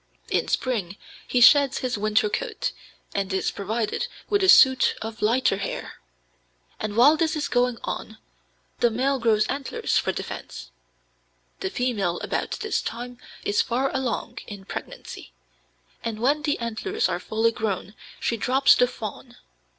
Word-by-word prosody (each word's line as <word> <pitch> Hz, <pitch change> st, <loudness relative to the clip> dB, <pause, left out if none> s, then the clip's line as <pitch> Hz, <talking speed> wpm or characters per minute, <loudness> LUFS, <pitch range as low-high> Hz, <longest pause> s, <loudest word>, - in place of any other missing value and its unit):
In -, -, +1 dB
spring 205 Hz, -7 st, -1 dB, 0.3 s
he 250 Hz, -, +1 dB
sheds 280 Hz, +2 st, +7 dB
his 255 Hz, -1 st, -2 dB
winter 215 Hz, +2 st, +2 dB
coat, 455 Hz, -, -2 dB, 0.4 s
and 195 Hz, -1 st, -1 dB
is 190 Hz, -, 0 dB
provided 220 Hz, -, -2 dB, 0.2 s
with 405 Hz, -1 st, +3 dB
a 380 Hz, -, +3 dB
suit 260 Hz, -6 st, +7 dB
of 220 Hz, 0 st, -7 dB
lighter 230 Hz, -1 st, +2 dB
hair, -, -, -5 dB, 0.8 s
and 210 Hz, 0 st, -4 dB
while 285 Hz, +6 st, +7 dB
this 320 Hz, 0 st, 0 dB
is 300 Hz, -, -1 dB
going 245 Hz, -1 st, +1 dB
on -, -, -5 dB, 0.6 s
the 240 Hz, -, +4 dB
male 265 Hz, +4 st, 0 dB
grows 220 Hz, -2 st, +3 dB
antlers 275 Hz, -1 st, -1 dB
for -, -, 0 dB
defence. -, -, -7 dB, 0.9 s
The -, -, -2 dB
female 205 Hz, -8 st, -1 dB
about -, -, -2 dB
this 430 Hz, -2 st, 0 dB
time 245 Hz, +1 st, -6 dB, 0.3 s
is 205 Hz, -, +2 dB
far 260 Hz, +3 st, -1 dB
along 245 Hz, -2 st, -2 dB
in 200 Hz, -2 st, -9 dB
pregnancy, -, -, -8 dB, 0.7 s
and 220 Hz, -2 st, -3 dB
when 280 Hz, +6 st, +2 dB
the 295 Hz, -1 st, 0 dB
antlers 240 Hz, -, -1 dB
are -, -, -2 dB
fully 225 Hz, +1 st, +1 dB
grown 210 Hz, -3 st, -3 dB, 0.3 s
she 230 Hz, -, -1 dB
drops 265 Hz, +5 st, +4 dB
the 250 Hz, -, +4 dB
fawn. 240 Hz, +1 st, -8 dB
240 Hz, 150 wpm, -25 LUFS, 215-265 Hz, 0.9 s, sheds